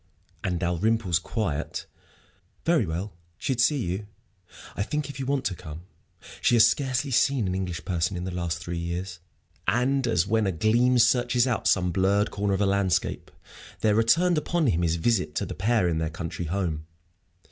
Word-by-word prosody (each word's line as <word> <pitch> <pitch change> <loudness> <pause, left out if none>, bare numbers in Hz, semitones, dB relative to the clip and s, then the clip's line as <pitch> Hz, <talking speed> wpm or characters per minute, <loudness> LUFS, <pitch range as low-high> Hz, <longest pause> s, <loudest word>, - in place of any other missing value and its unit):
And 90 -2 -1
Dalrymple's 90 +1 +1
quiet, 90 -4 -3 0.8
"Very 165 - +3
well. 90 +6 -4 0.2
She'd 130 -3 -1
see 135 -1 +2
you, 95 +4 -3 0.7
I - - -3
think, 150 +6 -2
if 140 - -11
you 135 - -3
want 140 -1 0
to - - 0
come. 80 0 -9 0.6
She 120 - +4
has 115 0 +7
scarcely 135 +2 -1
seen 125 -1 +2
an 90 - -1
English 90 -2 -4
person 90 +1 -1
in 90 - -4
the 95 0 -4
last 85 -2 -2
three 85 0 -5
years." 85 +1 -4 0.5
And 130 +2 +2
as 90 -6 +2
when 110 0 +1
a - - +1
gleam 120 +8 +3
searches 120 0 +3
out 125 -4 0
some 90 -2 +2
blurred 100 +3 +2
corner 100 -1 0
of 95 - -2
a - - +3
landscape, 100 -2 0 0.5
there 105 - +3
returned 160 +10 +3
upon 170 +1 0
him 90 -9 +2
his 85 -1 +1
visit 90 -4 0
to - - -1
the - - -6
pair 110 -2 +1
in 80 -2 0
their 80 -1 -1
country 85 +1 -5
home. 80 -3 -2
100 Hz, 180 wpm, -26 LUFS, 85-120 Hz, 0.8 s, has